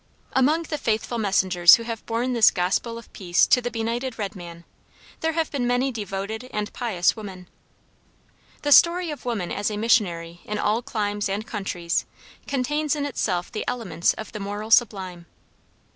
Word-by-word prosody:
Among 300 Hz, +6 st, +3 dB
the 305 Hz, -2 st, -4 dB
faithful 230 Hz, 0 st, -1 dB
messengers 185 Hz, -4 st, +5 dB
who 230 Hz, -, -5 dB
have 230 Hz, -1 st, -5 dB
borne 240 Hz, +3 st, -1 dB
this 230 Hz, -3 st, +6 dB
Gospel 195 Hz, +6 st, -1 dB
of 230 Hz, -, -13 dB
peace 175 Hz, -2 st, +2 dB
to 250 Hz, -, +4 dB
the 245 Hz, -, -2 dB
benighted 235 Hz, +2 st, -3 dB
red 205 Hz, -1 st, -4 dB
man, 170 Hz, -2 st, -10 dB, 0.6 s
there 320 Hz, 0 st, 0 dB
have 325 Hz, -1 st, -1 dB
been 255 Hz, -4 st, -1 dB
many 250 Hz, +2 st, +1 dB
devoted 210 Hz, +1 st, -5 dB
and 210 Hz, -1 st, -3 dB
pious 210 Hz, -8 st, +1 dB
women. 190 Hz, -5 st, -9 dB, 1.2 s
The 290 Hz, -, 0 dB
story 340 Hz, +2 st, +6 dB
of 295 Hz, -, -8 dB
woman 220 Hz, -8 st, -2 dB
as 205 Hz, +1 st, -1 dB
a 210 Hz, -, -4 dB
missionary 175 Hz, -7 st, +1 dB
in 210 Hz, -, -4 dB
all 210 Hz, +3 st, +1 dB
climes 205 Hz, -3 st, -2 dB
and 205 Hz, +3 st, -2 dB
countries 180 Hz, -6 st, -2 dB, 0.4 s
contains 295 Hz, +3 st, 0 dB
in 290 Hz, -1 st, -2 dB
itself 185 Hz, -10 st, -2 dB
the 215 Hz, -, -3 dB
elements 190 Hz, -9 st, 0 dB
of 220 Hz, -, -8 dB
the 215 Hz, -, -6 dB
moral 205 Hz, +2 st, -5 dB
sublime. 190 Hz, -7 st, +2 dB
220 Hz, 170 wpm, -24 LUFS, 195-245 Hz, 1.2 s, this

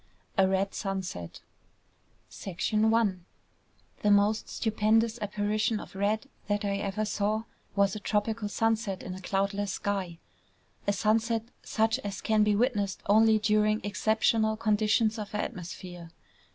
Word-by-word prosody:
A 190 Hz, -1 st, +4 dB
Red 195 Hz, +1 st, 0 dB
Sunset 190 Hz, -, -4 dB, 1.1 s
I 190 Hz, -, -4 dB, 1.5 s
The 210 Hz, -, +2 dB
most 205 Hz, +1 st, +3 dB
stupendous 220 Hz, +1 st, +1 dB
apparition 210 Hz, +1 st, 0 dB
of -, -, -10 dB
red 210 Hz, +6 st, 0 dB, 0.2 s
that 205 Hz, 0 st, 0 dB
I 200 Hz, 0 st, 0 dB
ever 200 Hz, +1 st, -2 dB
saw 215 Hz, +1 st, 0 dB, 0.3 s
was 200 Hz, -1 st, +3 dB
a -, -, -4 dB
tropical 210 Hz, +1 st, -1 dB
sunset 220 Hz, -3 st, 0 dB
in 185 Hz, -, -5 dB
a 185 Hz, -, -8 dB
cloudless 200 Hz, +1 st, -1 dB
sky, 190 Hz, -4 st, -2 dB, 0.7 s
a 200 Hz, -, +3 dB
sunset 220 Hz, +3 st, +1 dB, 0.2 s
such 225 Hz, +2 st, +1 dB
as 205 Hz, -5 st, -5 dB
can 215 Hz, -1 st, +2 dB
be 210 Hz, -1 st, +3 dB
witnessed 205 Hz, -4 st, 0 dB
only 220 Hz, +1 st, +5 dB
during 215 Hz, 0 st, +2 dB
exceptional 220 Hz, +1 st, +1 dB
conditions 215 Hz, +1 st, +2 dB
of 210 Hz, 0 st, -6 dB
atmosphere. 180 Hz, -4 st, -6 dB
210 Hz, 125 wpm, -29 LUFS, 200-220 Hz, 1.5 s, only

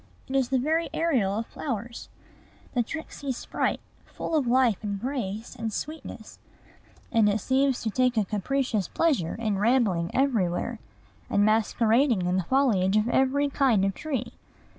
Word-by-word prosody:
It 265 Hz, -, -4 dB
is 265 Hz, -2 st, +2 dB
the 265 Hz, -, +2 dB
very 315 Hz, +6 st, 0 dB
Ariel 245 Hz, -12 st, +1 dB
of 225 Hz, -, -2 dB
flowers, 235 Hz, -4 st, -5 dB, 0.6 s
the 245 Hz, -, +2 dB
tricksy 285 Hz, +1 st, -5 dB
sprite, 245 Hz, -, -2 dB, 0.3 s
full -, -, -6 dB
of 285 Hz, -5 st, +1 dB
life 245 Hz, -4 st, +3 dB
and 200 Hz, -2 st, -3 dB
grace 230 Hz, -4 st, -4 dB
and 225 Hz, -1 st, -3 dB
sweetness; 310 Hz, +9 st, -7 dB, 0.7 s
and 225 Hz, -3 st, +4 dB
it 205 Hz, +1 st, +1 dB
seems 265 Hz, +3 st, +1 dB
to 220 Hz, -, -1 dB
take 250 Hz, +1 st, +1 dB
a 215 Hz, -, +3 dB
capricious 215 Hz, 0 st, -1 dB
pleasure 275 Hz, -, 0 dB
in 215 Hz, -4 st, -1 dB
rambling 205 Hz, -7 st, +2 dB
everywhere, 230 Hz, -4 st, 0 dB, 0.5 s
and 205 Hz, 0 st, +3 dB
masquerading 225 Hz, +1 st, +2 dB
in 180 Hz, +1 st, +1 dB
the 185 Hz, -, 0 dB
foliage 215 Hz, -7 st, +2 dB
of 215 Hz, +2 st, +1 dB
every 265 Hz, +3 st, +2 dB
kind 260 Hz, -8 st, +2 dB
of 195 Hz, -, 0 dB
tree. 295 Hz, +4 st, -4 dB
235 Hz, 155 wpm, -26 LUFS, 205-270 Hz, 0.7 s, and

